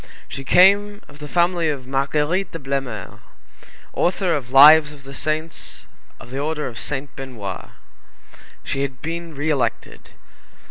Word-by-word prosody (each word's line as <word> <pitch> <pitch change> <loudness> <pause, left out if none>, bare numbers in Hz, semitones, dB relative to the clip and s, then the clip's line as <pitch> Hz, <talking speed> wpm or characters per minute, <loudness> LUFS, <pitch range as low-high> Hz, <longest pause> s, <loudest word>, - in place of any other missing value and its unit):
She 135 - -7
came 200 +6 +4
of 145 0 -16
the 150 - -8
family 170 0 +1
of 140 -4 -4
Marguerite 150 +7 -1
de - - -3
Blemeur, 135 - -5 0.7
author 180 0 +1
of 130 -5 -4
Lives 150 +3 +8
of 140 -2 -15
the 135 +1 -10
Saints 155 +3 -4 0.3
of 120 - -13
the 135 - -4
Order 150 +1 -2
of 120 -3 -6
Saint 140 -1 -4
Benoît. 115 -8 -7 0.9
She 135 - -3
had 135 -1 -4
been 165 0 -5
re 150 +3 -1
elected. 140 -4 -3
145 Hz, 145 wpm, -21 LUFS, 135-165 Hz, 0.9 s, Lives